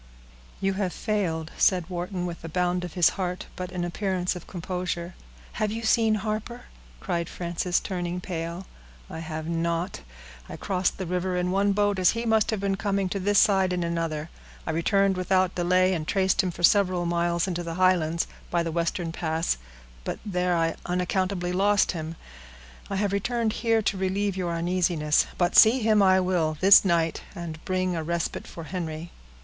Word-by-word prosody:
"You 195 0 0
have 185 -3 -1
failed," 170 -8 -2
said 180 -3 +3
Wharton, 180 0 -4
with 170 -1 -6
a 165 - -6
bound 180 +1 0
of 175 - -7
his 175 -3 +5
heart, 180 -1 -4
but 180 0 -5
an 175 -1 -2
appearance 185 0 -1
of 180 - -9
composure. 180 -1 -4 0.5
"Have 210 -1 +1
you 225 +1 -4
seen 220 0 +3
Harper?" 215 +3 -4 0.4
cried 170 - -2
Frances, 175 +1 -1
turning 180 -2 -3
pale. 170 0 -5 0.5
"I - - -6
have 160 -1 -5
not. 170 +2 -2 0.5
I - - -7
crossed 185 -2 -1
the 190 - -4
river 180 +1 -1
in 180 0 0
one 200 +1 +2
boat 205 -1 +1
as 180 - +5
he 230 +1 -3
must 220 -2 +2
have 220 -3 0
been 195 0 -1
coming 200 -2 0
to 200 - -2
this 205 +2 +1
side, 190 -3 +4
in 180 -1 -1
another. 165 -2 -2 0.3
I - - -1
returned 195 +4 +2
without 185 0 +2
delay, 185 +1 +2
and 155 -3 -3
traced 190 0 +2
him 185 - -1
for 175 - -7
several 185 -2 +4
miles 170 +1 0
into 175 -2 -2
the 165 -1 -5
Highlands, 170 -3 +2 0.2
by 170 -1 +1
the 165 - -3
western 170 0 -1
pass, 160 - -1 0.5
but - - -3
there 180 -3 0
I 165 0 0
unaccountably 180 0 -1
lost 200 +2 +3
him. 160 -1 -5 0.7
I 195 - -2
have 200 0 0
returned 225 +2 0
here 225 -2 +2
to 200 - 0
relieve 195 +1 0
your 180 -2 -2
uneasiness, 170 -3 +1
but 175 0 +1
see 230 +4 +7
him 215 -1 +4
I 190 -1 +5
will 175 -4 0
this 195 +2 +8
night, 170 -4 +1
and 165 -3 -7
bring 185 -1 0
a 165 - -2
respite 170 +1 -3
for 165 - -8
Henry." 165 -1 -5
180 Hz, 180 wpm, -26 LUFS, 170-195 Hz, 0.7 s, this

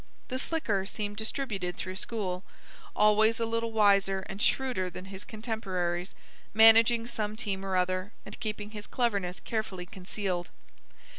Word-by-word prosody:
The 255 0 -2
slicker 245 -11 0
seemed 205 -1 -4
distributed 215 -6 -3
through 185 0 -4
school, 190 -4 -2 0.5
always 215 +2 +5
a 230 - +1
little 230 0 -1
wiser 200 -3 +4
and 195 - -6
shrewder 250 -10 +1
than 180 +2 -8
his 195 0 -7
contemporaries, 190 -6 -3 0.4
managing 225 +1 +7
some 215 -3 -2
team 200 -4 -3
or 190 -1 -1
other, 185 +2 0
and - - -7
keeping 215 -1 -4
his 210 -1 -7
cleverness 200 -7 0
carefully 210 -5 -3
concealed. 185 -1 -3
205 Hz, 140 wpm, -30 LUFS, 185-225 Hz, 0.5 s, managing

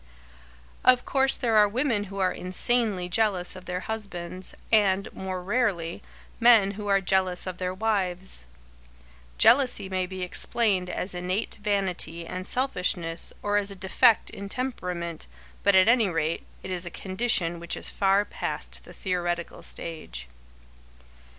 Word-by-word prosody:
Of 250 -1 +5
course 270 -1 +2
there 230 -4 +1
are 210 -1 +7
women 230 -2 0
who 195 0 -9
are 185 -1 +2
insanely 195 0 0
jealous 185 -2 +2
of 185 - -11
their 180 0 -3
husbands, 185 -4 -5 0.2
and, 200 -3 +3
more 185 -1 -5
rarely, 190 -6 -1 0.4
men 230 -5 +6
who 205 +1 -7
are 195 -1 +3
jealous 185 -1 +1
of 185 -1 -6
their 180 0 -1
wives. 190 - -1 0.9
Jealousy 245 - +4
may 185 -1 -1
be 185 0 -5
explained 185 0 +2
as 180 +1 -3
innate 180 +5 -3
vanity 185 -5 -1
and 185 +2 -5
selfishness 180 -10 0
or 205 0 +1
as 205 -1 +1
a 200 - -6
defect 200 +5 +3
in 200 0 -8
temperament, 180 -10 -4 0.3
but 200 -1 +4
at 190 +1 +6
any 230 -2 +5
rate, 165 -1 -2 0.2
it 190 - -6
is 180 -1 -1
a - - -3
condition 185 -3 -1
which 170 0 -3
is - - -6
far 195 +1 +2
past - - -6
the - - -12
theoretical 175 -3 -3
stage. 65 - -3
190 Hz, 145 wpm, -26 LUFS, 180-210 Hz, 0.9 s, are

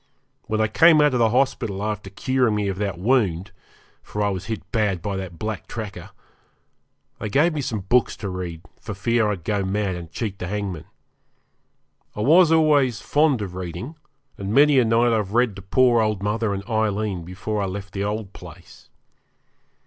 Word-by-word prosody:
When 110 0 -1
I 110 - +3
came 165 +6 +6
out 150 -2 +4
of 125 - +1
the 115 -1 +4
hospital 120 -5 0
after 105 -2 -3
curing 125 +2 0
me 105 -1 -1
of 95 0 -4
that 100 -4 -2
wound 100 -4 +1 0.5
for 105 - -4
I 100 - +2
was 95 -3 -4
hit 110 -2 -4
bad 105 -5 +1
by 100 +3 -4
that 95 -3 -6
black 110 -1 -5
tracker 110 -4 -7 1.1
they 110 - -4
gave 150 +10 +3
me 150 - -2
some 110 -6 -3
books 120 +6 +1
to 100 - -5
read 90 -3 -5 0.2
for 105 - -7
fear 115 +2 +1
I'd 95 -5 -3
go 100 +1 -1
mad 100 0 -1
and 85 -3 -8
cheat 100 -2 -4
the 90 - -4
hangman. 95 -5 -4 1.3
I 105 - -3
was 165 +7 +5
always 145 -8 +3
fond 145 -7 +2
of 95 -3 -6
reading, 95 - -6 0.4
and 100 0 -4
many 145 +3 +5
a 125 - +3
night 115 +1 +3
I've 105 -3 -1
read 120 -4 +2
to - - -8
poor 120 +4 +3
old 105 -3 -1
mother 105 +1 0
and 100 0 -5
Aileen 105 -4 -1
before 100 +4 -4
I 100 - -1
left 95 +1 -7
the 100 - -2
old 105 -1 -3
place. - - -14
105 Hz, 185 wpm, -23 LUFS, 95-120 Hz, 1.3 s, came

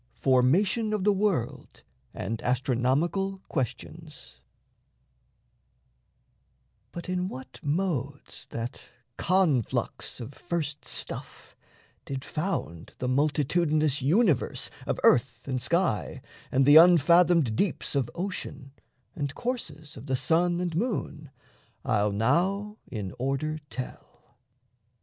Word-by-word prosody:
FORMATION 185 - +2
OF 210 -3 -1
THE 205 +1 +4
WORLD 160 - -2 0.3
AND 110 +5 -4
ASTRONOMICAL 135 +10 0
QUESTIONS 130 - -5 2.5
But 170 - -7
in 180 0 -1
what 130 -7 -9
modes 145 -4 -2
that 115 +3 -6 0.3
conflux 170 - 0
of 120 +4 -7
first 150 -6 -4
stuff - - -6 0.5
Did 135 0 -5
found 150 - -4
the 125 - -3
multitudinous 150 +2 +2
universe 165 - +2 0.2
Of - - -1
earth, 125 +3 +3
and 130 -2 -1
sky, 170 - 0 0.3
and 135 +1 +3
the 145 +2 +8
unfathomed 170 -5 +6
deeps 190 - -1
Of 135 -4 0
ocean, 175 -7 -5 0.4
and 145 -2 -3
courses 160 - -5
of 125 - -10
the 130 - +1
sun 170 +7 +2
and 175 -3 -2
moon, 160 - -2 0.6
I'll 105 -1 +2
now 185 - +1
in 105 -6 -5
order 140 +4 -1
tell. 130 - -9
150 Hz, 105 wpm, -27 LUFS, 130-180 Hz, 2.5 s, the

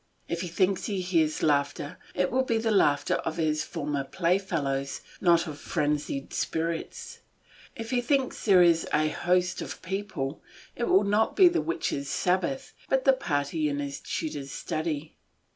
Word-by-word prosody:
If 170 0 -2
he 180 - -3
thinks 185 +2 +1
he 200 -3 -2
hears 165 -4 +1
laughter, 145 +2 0 0.2
it 180 0 +1
will 260 - +3
be 235 -3 0
the 225 0 0
laughter 145 -8 +3
of 160 - -4
his 155 -2 +1
former 145 -3 -3
playfellows, 165 -5 -1 0.2
not 170 -2 +4
of 150 -3 -7
frenzied 145 -3 -2
spirits; 165 0 -3 0.6
if 225 -2 -6
he 250 -1 +2
thinks 265 +1 0
there 190 -4 +7
is 170 -1 +3
a 155 0 +2
host 180 +3 +1
of - - -6
people, 185 -7 -4 0.3
it 235 - -1
will 195 -2 +4
not 205 +2 +2
be 375 - +8
the 345 - +2
witches' 145 -3 -2
sabbath, 190 +9 0 0.2
but 265 -1 +2
the 270 - +7
party 150 - -1
in 145 - -2
his 140 -1 -4
tutor's 145 -3 -4
study. 155 -2 -3
170 Hz, 160 wpm, -27 LUFS, 150-195 Hz, 0.6 s, be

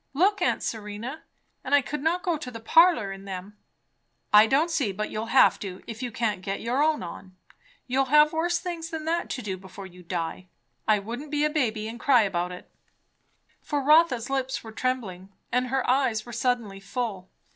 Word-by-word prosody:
Look, 390 +5 +3
aunt 355 - +1
Serena. 220 +6 -5 0.4
And 285 +2 +2
I 285 - +4
could 300 +2 -4
not 340 +4 0
go 350 -4 +1
to 300 -4 -6
the 230 -2 -8
parlour 320 - +4
in 195 0 -9
them." 195 +1 -7 0.8
"I 210 +1 +8
don't 300 +8 +2
see 275 -10 0
but 210 +3 -4
you'll 215 +1 -3
have 260 +3 +5
to, 190 -2 -7
if 230 0 -8
you 245 -2 -3
can't 215 -4 -1
get 195 +1 -3
your 245 +4 0
own 310 -4 +2
on. 185 +2 -9 0.5
You'll 265 +1 +1
have 300 +3 +5
worse 340 +2 +1
things 335 -2 -5
than 320 -2 -5
that 335 +2 -1
to 255 - -4
do 190 -2 -3
before 190 +1 -10
you 180 -1 -13
die. 175 +1 -4 0.4
I 215 -1 +5
wouldn't 235 +9 -6
be 295 0 +1
a 300 - +1
baby, 225 -8 0
and 230 +1 -7
cry 250 -2 +5
about 180 -3 -1
it." 180 - -11 0.9
For 290 -2 -2
Rotha's 285 -5 +4
lips 265 0 -2
were 225 - -9
trembling 215 -7 -3 0.2
and 250 +1 +1
her 265 +1 -1
eyes 250 -4 +1
were 240 - -9
suddenly 235 -4 -1
full. 195 -2 -4
245 Hz, 200 wpm, -26 LUFS, 205-295 Hz, 0.9 s, I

